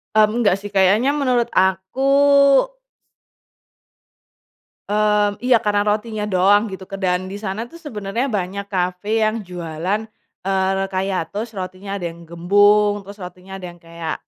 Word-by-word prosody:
Mmm, 215 +2 +4
enggak 205 -5 +3
sih 205 +1 -8
kayaknya 200 +7 +4
menurut 255 -5 +1
aku 190 +5 +1 2.9
Mmm, 210 0 +2
iya 250 -2 +5
karena 205 0 +2
rotinya 210 0 -2
doang 195 +3 +4
gitu 190 0 -8
ke 195 - -3
dan 180 0 0
disana 205 +3 -5
tuh 335 - -11
sebenernya 230 - -4
banyak 195 +2 -4
cafe 180 +2 -2 0.2
yang 215 +1 0
jualan, 175 +3 -3 0.5
eee, 190 -1 +1
re 195 - 0
kayak 190 0 -1
toast 220 +3 -4
rotinya 185 +2 -7
ada 175 - -5
yang 170 +1 -12
gembung 205 +4 +4
terus 200 +1 -11
rotinya 185 +2 -9
ada - - -7
yang 175 - -14
kayak, 165 -1 -6
200 Hz, 145 wpm, -20 LUFS, 185-210 Hz, 2.9 s, iya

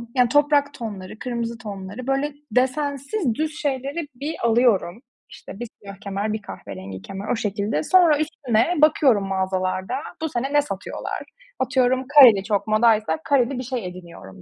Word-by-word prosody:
yani, 250 -2 +4
toprak 290 0 +3
tonları, 215 -5 -7
kırmızı 235 -2 -3
tonları; 205 +2 -8
böyle 275 +2 0 0.2
desensiz, 280 - 0
düz 310 -1 -3
şeyleri 285 +3 -2
bir 295 +5 -4
alıyorum. 230 -3 +2 0.3
İşte, 200 - -11
bir 240 - -4
siyah 200 -1 -9
kemer, 200 +2 -3
bir 215 - -4
kahverengi 95 - -9
kemer, 195 - -7
o - - +2
şekilde. 205 -6 -2
Sonra 345 -5 +5
üstüne, 300 -1 0
bakıyorum 260 -10 +4
mağazalarda. 190 +3 -1 0.3
Bu 320 - -1
sene 270 +3 -3
ne 290 - +5
satıyorlar? 200 -8 -5 0.4
Atıyorum, 260 -1 +1
kareli 250 -9 +8
çok 205 0 -1
modaysa 215 +3 +3
kareli 275 -3 +2
bir - - -4
şey 245 -5 -4
ediniyorum 170 - -11
240 Hz, 150 wpm, -23 LUFS, 200-280 Hz, 0.4 s, kareli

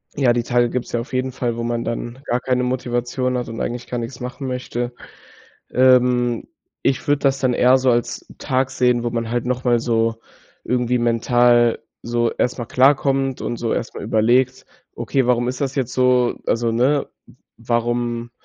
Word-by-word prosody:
Ja, 135 -4 +3
die 120 0 0
Tage 120 0 +2
gibt‘s 125 0 -4
ja 120 - 0
auf 115 - -7
jeden 130 +1 -1
Fall, 120 -2 -2
wo 120 - -3
man 120 0 -2
dann 120 +1 -4
gar 120 -2 0
keine 125 0 0
Motivation 125 0 -1
hat 120 - -4
und 115 - -6
eigentlich 120 0 -4
gar 125 - -3
nix 120 +1 -5
machen 125 +2 -6
möchte. 125 -1 -3 0.8
Ähm, 125 -2 +3 0.4
ich 130 -1 0
würde 145 0 +3
das 135 -1 +1
dann 130 -2 +1
eher 125 +2 +5
so 130 0 +1
als 120 -1 0
Tag 130 -1 0
sehen, 125 -2 +1
wo - - +1
man 115 -1 -2
halt 120 0 -1
noch 125 0 -2
mal 120 -1 +3
so 115 -1 +1 0.5
irgendwie 125 0 +1
mental 120 0 +3 0.2
so 120 0 0
erstmal 120 -1 -2
klarkommt 135 0 +2
und 120 - -3
so 115 -1 -2
erstmal - - -4
überlegt: 125 +4 +2 0.3
„Okay, 135 -2 0
warum 120 0 +2
ist 125 +2 -3
das 140 0 -2
jetzt 125 -3 -2
so?“ 125 -1 +3
Also, 115 0 +1
ne? 135 +5 +2 0.2
„W - - -19 0.2
warum 120 0 -1
125 Hz, 180 wpm, -20 LUFS, 120-130 Hz, 0.8 s, eher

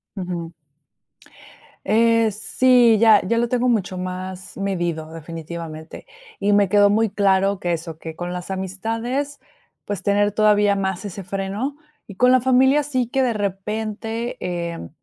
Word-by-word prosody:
Ujú. 175 -3 -5 1.3
Eh, 230 0 +3
sí, 240 +2 +4
ya 220 -2 +6
ya 230 +3 +1
lo 235 0 +1
tengo 250 0 +1
mucho 195 -6 0
más 185 +1 -6
medido 175 -5 -2
definitivamente, 165 0 -8 0.3
y 205 +1 +2
me 200 -2 +4
quedó 205 +1 +5
muy 220 +1 +2
claro 195 -1 +2
que 175 -1 -1
eso, 165 -1 -5
que 160 -1 -8
con 175 +2 -5
las 180 +1 -6
amistades, 225 +9 -3 0.4
pues, 205 -2 -4
tener 205 +1 +2
todavía 210 -1 +3
más 190 0 -2
ese 195 -1 -7
freno 195 +8 -3 0.3
y 200 - -10
con 250 +6 +4
la 255 - +5
familia 260 +3 +4
sí 255 -4 -1
que 270 - 0
de 250 -3 +1
repente, 215 +3 -3
eh, 170 - -4
200 Hz, 150 wpm, -21 LUFS, 180-230 Hz, 1.3 s, ya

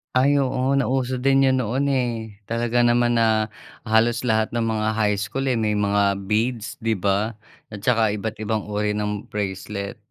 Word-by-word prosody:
Ay, 140 +3 +4
oo 135 0 +1
nauso 130 -1 0
din 135 +2 +3
'yon 130 -1 +3
noon, 130 +4 0
eh, 115 -6 -2
talaga 120 +2 +1
naman 120 0 +3
na 110 -1 +2 0.3
halos 115 +1 +2
lahat 110 -3 0
ng 120 - 0
mga 110 -1 0
high 105 -2 +1
school, 105 +6 -3
eh, 125 - +1
may 110 -1 0
mga 100 -1 +1
beads, 115 +1 -1
'di 115 -1 0
ba 100 +3 0 0.4
at 105 - -7
saka 115 -3 +2
iba't 105 +1 -4
ibang 110 0 -1
uri 105 0 -1
ng 105 0 -3
bracelet. 100 +1 -4
110 Hz, 170 wpm, -23 LUFS, 105-125 Hz, 0.4 s, Ay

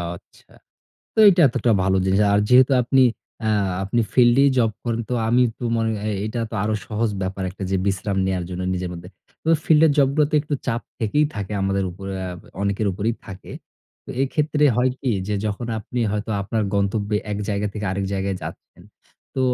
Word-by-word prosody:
আচ্ছা। - - -20 0.6
তো - - -7
এইটা 180 -3 +5
এতোটা 120 -1 +1
ভালো 95 0 +2
জিনিস। 95 +1 +2
আর 100 - +4
যেহেতু 130 +2 +6
আপনি 130 +2 +3 0.4
আ - - +2 0.3
আপনি 100 +5 0
ফিল্ডেই 125 +3 +5
জব 115 -3 +3
করেন 115 -1 -1
তো - - +1
আমি 120 +2 +4 0.2
তো - - -6
মনে 115 0 0 0.2
এ - - 0 0.2
এটা 110 +2 -4
তো - - -7
আরো 110 +1 0
সহজ 110 +1 -1
ব্যাপার 95 +1 -3
একটা 95 +2 -10
যে 95 - +2
বিশ্রাম 100 0 -1
নেয়ার 95 -2 -1
জন্য 90 0 -4
নিজের 90 -1 -3
মধ্যে। 90 0 -9 0.3
তো - - -4 0.2
ফিল্ডের 155 -1 +5
জবগুলোতে 145 +2 +3
একটু 150 -1 -3
চাপ 120 -2 0 0.2
থেকেই 130 +6 +2
থাকে 105 -1 -5
আমাদের 95 0 0
উপরে 95 +2 -7
অ্যা 95 -1 -4 0.3
অনেকের 100 +1 0
উপরেই 105 +5 -1
থাকে। 95 -1 -10 0.5
তো - - -9
এক্ষেত্রে 150 +2 +1
হয় 125 +1 +3
কি? 130 - 0 0.2
যে 105 - 0
যখন 105 +3 -3
আপনি 120 +3 -4
হয়তো 105 +1 -3
আপনার 110 +2 -1
গন্তব্যে 100 +1 0 0.2
এক 105 - -3
জায়গা 105 0 0
থেকে 105 0 -5
আরেক 100 +1 -2
জায়গায় 95 0 -2
যাচ্ছেন, - - -10 0.5
তো 130 - -1
110 Hz, 185 wpm, -22 LUFS, 95-125 Hz, 0.6 s, যেহেতু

